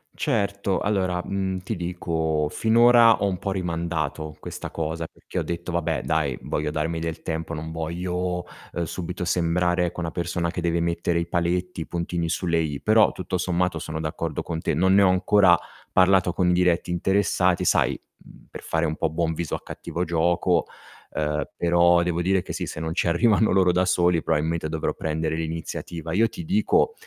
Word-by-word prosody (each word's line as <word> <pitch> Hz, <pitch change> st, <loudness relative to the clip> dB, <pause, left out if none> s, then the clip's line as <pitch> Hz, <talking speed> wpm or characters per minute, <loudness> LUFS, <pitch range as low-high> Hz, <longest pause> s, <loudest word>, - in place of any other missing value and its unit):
Certo, 100 Hz, -7 st, 0 dB
allora, 95 Hz, -4 st, 0 dB
mhmm, 95 Hz, -1 st, -2 dB
ti 95 Hz, +5 st, -4 dB
dico: 80 Hz, -3 st, -1 dB
finora 115 Hz, +1 st, +5 dB
ho 100 Hz, -, +3 dB
un 95 Hz, -2 st, -1 dB
po' 100 Hz, +3 st, -3 dB
rimandato 85 Hz, -4 st, -3 dB
questa -, -, -7 dB
cosa 80 Hz, 0 st, -3 dB
perchè -, -, -10 dB
ho -, -, -1 dB
detto: 85 Hz, +1 st, -4 dB
"Vabbè, 85 Hz, -2 st, -1 dB
dai, 75 Hz, -5 st, 0 dB
voglio 75 Hz, 0 st, -2 dB
darmi 80 Hz, +2 st, -2 dB
del 80 Hz, 0 st, -4 dB
tempo, 80 Hz, 0 st, -4 dB
non 80 Hz, 0 st, -5 dB
voglio, 90 Hz, +2 st, -3 dB, 0.3 s
uhm, 85 Hz, -, -1 dB
subito 90 Hz, +3 st, -5 dB
sembrare, 90 Hz, +1 st, +1 dB
ecco, 90 Hz, +1 st, -4 dB
una 80 Hz, -, -3 dB
persona 85 Hz, 0 st, -2 dB
che 90 Hz, -, -4 dB
deve 85 Hz, 0 st, 0 dB
mettere 85 Hz, 0 st, 0 dB
i 85 Hz, -, -3 dB
paletti, 85 Hz, +1 st, -1 dB
i -, -, -6 dB
puntini 85 Hz, 0 st, -2 dB
sulle 85 Hz, 0 st, 0 dB
i". 75 Hz, -4 st, -2 dB
Però 110 Hz, 0 st, +5 dB
tutto 90 Hz, 0 st, -3 dB
sommato 90 Hz, -1 st, 0 dB
sono 80 Hz, 0 st, -5 dB
d'accordo 80 Hz, -1 st, -3 dB
con 80 Hz, -2 st, -4 dB
te. -, -, -1 dB
Non 95 Hz, +5 st, +3 dB
ne 100 Hz, -, +6 dB
ho 95 Hz, -, +5 dB
ancora 95 Hz, -1 st, +5 dB, 0.4 s
parlato 90 Hz, -1 st, +4 dB
con 90 Hz, 0 st, +1 dB
i -, -, +4 dB
diretti 90 Hz, -1 st, +2 dB
interessati, 95 Hz, 0 st, +1 dB
sai, -, -, +2 dB, 0.3 s
mhmm, -, -, -17 dB
per -, -, -9 dB
fare 80 Hz, 0 st, 0 dB
un 80 Hz, 0 st, -2 dB
po' 80 Hz, -, 0 dB
buon 80 Hz, +1 st, -1 dB
viso 85 Hz, -1 st, -3 dB
a -, -, -7 dB
cattivo 90 Hz, -, -5 dB
gioco. 85 Hz, +1 st, +1 dB, 0.5 s
Uhm, 75 Hz, -1 st, -1 dB
però 85 Hz, 0 st, +4 dB
devo 85 Hz, 0 st, -1 dB
dire 95 Hz, +1 st, +2 dB
che -, -, -7 dB
sì, -, -, -3 dB
se -, -, -6 dB
non 80 Hz, 0 st, -3 dB
ci -, -, 0 dB
arrivano 105 Hz, +6 st, +3 dB
loro 95 Hz, -2 st, +4 dB
da 90 Hz, +1 st, +2 dB
soli, 90 Hz, -2 st, +2 dB
probabilmente 80 Hz, +1 st, -1 dB
dovrò 80 Hz, 0 st, -2 dB
prendere 80 Hz, 0 st, -2 dB
l'iniziativa. 80 Hz, 0 st, -5 dB
Io 110 Hz, +5 st, +4 dB
ti 175 Hz, -, -8 dB
dico, 210 Hz, -, +2 dB
85 Hz, 190 wpm, -24 LUFS, 80-90 Hz, 0.5 s, ne